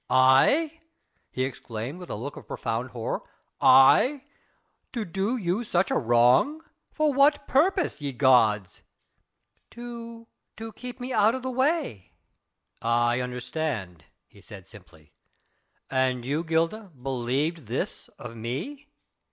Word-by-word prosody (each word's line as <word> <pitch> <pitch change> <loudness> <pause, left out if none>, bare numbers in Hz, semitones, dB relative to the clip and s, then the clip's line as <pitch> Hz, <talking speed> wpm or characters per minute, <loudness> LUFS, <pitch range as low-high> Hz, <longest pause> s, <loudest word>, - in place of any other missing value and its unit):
"I?" 140 - +4 0.5
he 130 - -2
exclaimed 125 +2 -5
with 180 - -10
a - - -3
look 135 +7 -6
of - - -12
profound 120 +1 -3
horror. 120 -3 -4 0.4
"I?... 250 - +6 0.7
to 230 -4 -3
do 195 +7 -1
you 190 +2 -1
such 185 -4 0
a - - +1
wrong! 125 - +3 0.3
For 305 -2 +1
what 280 +2 +3
purpose, 340 - +1
ye 140 -1 -3
gods?" 115 -7 +3 0.9
"To... 235 -1 -9 0.3
to 225 0 -7
keep 250 0 -9
me 250 +1 -5
out 215 +2 +4
of 260 - -6
the 260 - -3
way...." 260 - -1 0.7
"I 120 +1 +1
understand," 125 - -4 0.2
he 100 - -20
said 95 -3 -12
simply. 85 -6 -16 0.8
"And 130 -2 0
you, 145 +5 -1
Gilda, 165 +6 -1
believed 135 +4 -2
this 120 - -3
of 115 -1 -9
me?" 145 - -6
140 Hz, 125 wpm, -26 LUFS, -, 0.9 s, I